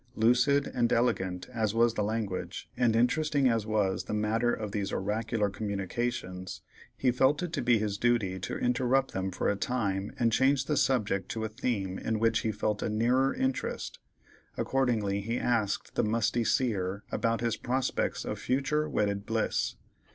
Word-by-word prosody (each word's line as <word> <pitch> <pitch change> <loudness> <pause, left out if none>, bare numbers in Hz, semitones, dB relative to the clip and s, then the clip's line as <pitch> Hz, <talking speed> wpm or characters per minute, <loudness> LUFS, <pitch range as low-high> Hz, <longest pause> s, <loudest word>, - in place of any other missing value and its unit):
Lucid 125 +5 +3
and 120 -1 +1
elegant 95 -7 0
as 110 -3 -1
was 115 0 +4
the 105 - -1
language, 105 -3 -3
and 120 -3 +2
interesting 140 +4 +2
as 115 -3 +1
was 105 -3 0
the - - -3
matter 110 +3 +1
of 105 -3 -3
these 100 -1 -2
oracular 110 +2 -1
communications, 100 -1 -4 0.3
he 130 - +2
felt 135 +6 +2
it 170 -2 -4
to - - -1
be 120 -1 +4
his 105 -2 -2
duty 115 -6 +1
to 95 - -4
interrupt 125 +2 +1
them 95 0 -1
for 95 - -2
a 100 - +2
time 100 -3 -1
and 115 -1 +2
change 135 +3 +3
the 150 - 0
subject 120 -8 +1
to 110 - -3
a - - 0
theme 105 -5 -2
in 110 - -1
which 115 0 +2
he 110 - -1
felt 105 0 -1
a - - -1
nearer 125 +5 +2
interest; 130 0 -2 0.6
accordingly 110 -7 0
he 115 +4 -2
asked 115 -6 0
the - - +1
musty 115 +2 +1
Seer 100 -6 0
about 115 0 0
his 115 -1 0
prospects 130 +1 -1
of - - -4
future 150 +4 0
wedded 100 -5 -1
bliss. 110 0 0
115 Hz, 170 wpm, -29 LUFS, 100-125 Hz, 0.6 s, was